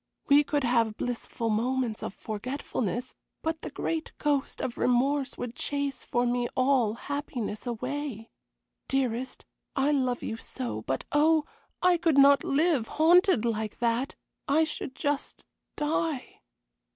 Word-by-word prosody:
We 285 Hz, +1 st, +7 dB
could 290 Hz, -1 st, 0 dB
have 230 Hz, -3 st, +2 dB
blissful 235 Hz, -1 st, -2 dB
moments 240 Hz, 0 st, 0 dB
of -, -, -5 dB
forgetfulness, 240 Hz, +1 st, -3 dB, 0.3 s
but 320 Hz, 0 st, -2 dB
the -, -, -5 dB
great 325 Hz, -1 st, -3 dB
ghost 290 Hz, -2 st, 0 dB
of 240 Hz, -, -3 dB
remorse 270 Hz, +3 st, +2 dB
would 245 Hz, -2 st, -4 dB
chase 280 Hz, -1 st, -2 dB
for 245 Hz, 0 st, 0 dB
me 245 Hz, 0 st, +1 dB
all 255 Hz, -4 st, +3 dB
happiness 250 Hz, -5 st, -4 dB
away. 250 Hz, -1 st, -4 dB, 0.6 s
Dearest, 255 Hz, -1 st, -1 dB, 0.3 s
I 275 Hz, +2 st, +2 dB
love 255 Hz, -4 st, 0 dB
you 225 Hz, -, -3 dB
so; 115 Hz, -, -4 dB
but 130 Hz, +4 st, -2 dB
oh, 310 Hz, +1 st, +4 dB, 0.4 s
I 360 Hz, -1 st, +5 dB
could 325 Hz, -4 st, +2 dB
not 280 Hz, 0 st, +7 dB
live, 290 Hz, -5 st, +2 dB
haunted 335 Hz, -, +5 dB
like 220 Hz, -2 st, -2 dB
that; 235 Hz, +3 st, 0 dB, 0.3 s
I 300 Hz, +3 st, +4 dB
should 305 Hz, -3 st, -4 dB
just 290 Hz, -2 st, -2 dB, 0.3 s
die." 300 Hz, -2 st, -2 dB
260 Hz, 135 wpm, -28 LUFS, 235-290 Hz, 0.6 s, We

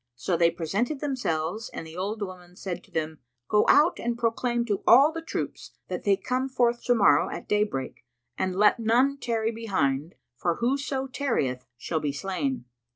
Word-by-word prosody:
So 170 Hz, +9 st, -1 dB
they 170 Hz, 0 st, +4 dB
presented 195 Hz, -, -2 dB
themselves 220 Hz, -, -2 dB
and -, -, -6 dB
the 160 Hz, 0 st, -11 dB
old 205 Hz, +4 st, -3 dB
woman 180 Hz, -2 st, -9 dB
said 180 Hz, -2 st, -5 dB
to -, -, -26 dB
them, 160 Hz, -1 st, -3 dB, 0.3 s
"Go 210 Hz, -, +3 dB
out 305 Hz, +4 st, +5 dB
and 235 Hz, 0 st, -2 dB
proclaim 235 Hz, +1 st, 0 dB
to 205 Hz, -4 st, -1 dB
all 275 Hz, +6 st, +7 dB
the 330 Hz, 0 st, -5 dB
troops 325 Hz, -, -5 dB, 0.2 s
that -, -, -4 dB
they 200 Hz, -1 st, +4 dB
come 255 Hz, +6 st, -2 dB
forth 240 Hz, -2 st, +1 dB
to 245 Hz, -, +4 dB
morrow 170 Hz, -10 st, +4 dB
at 170 Hz, -, -7 dB
daybreak 210 Hz, -11 st, -1 dB, 0.3 s
and 185 Hz, -1 st, -1 dB
let 210 Hz, +4 st, +4 dB
none 250 Hz, +5 st, +2 dB
tarry 225 Hz, -3 st, -1 dB
behind, 175 Hz, -10 st, -1 dB, 0.2 s
for 170 Hz, +6 st, 0 dB
whoso 270 Hz, +3 st, -1 dB
tarryeth 230 Hz, -, -2 dB
shall 160 Hz, +6 st, -2 dB
be 150 Hz, -2 st, -1 dB
slain." 195 Hz, -, -3 dB
210 Hz, 175 wpm, -26 LUFS, 170-245 Hz, 0.3 s, all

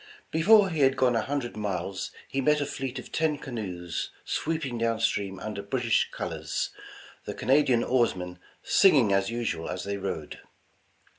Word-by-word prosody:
Before 195 Hz, +4 st, +5 dB
he 160 Hz, -, -2 dB
had 135 Hz, -1 st, +4 dB
gone 125 Hz, -2 st, +3 dB
a 115 Hz, -, +2 dB
hundred 135 Hz, -3 st, -3 dB
miles 100 Hz, -2 st, -3 dB, 0.2 s
he 135 Hz, -, -1 dB
met 150 Hz, +2 st, +3 dB
a 145 Hz, -, 0 dB
fleet 135 Hz, -2 st, -4 dB
of 125 Hz, -, -8 dB
ten 155 Hz, -2 st, +1 dB
canoes 95 Hz, -, -4 dB, 0.2 s
sweeping 150 Hz, -7 st, -2 dB
down 115 Hz, -1 st, +1 dB
stream 100 Hz, -4 st, 0 dB
under 105 Hz, -2 st, -5 dB
British 115 Hz, +3 st, +1 dB
col -, -, -4 dB
ors, -, -, -3 dB, 0.5 s
the -, -, -5 dB
Canadian 130 Hz, -3 st, +3 dB
oarsmen 90 Hz, -8 st, 0 dB, 0.2 s
singing 135 Hz, -, +5 dB
as 95 Hz, 0 st, +2 dB
usual 115 Hz, -8 st, -2 dB
as 90 Hz, -, -4 dB
they 100 Hz, 0 st, -3 dB
rowed. 95 Hz, -6 st, -5 dB
120 Hz, 160 wpm, -27 LUFS, 100-140 Hz, 0.5 s, Before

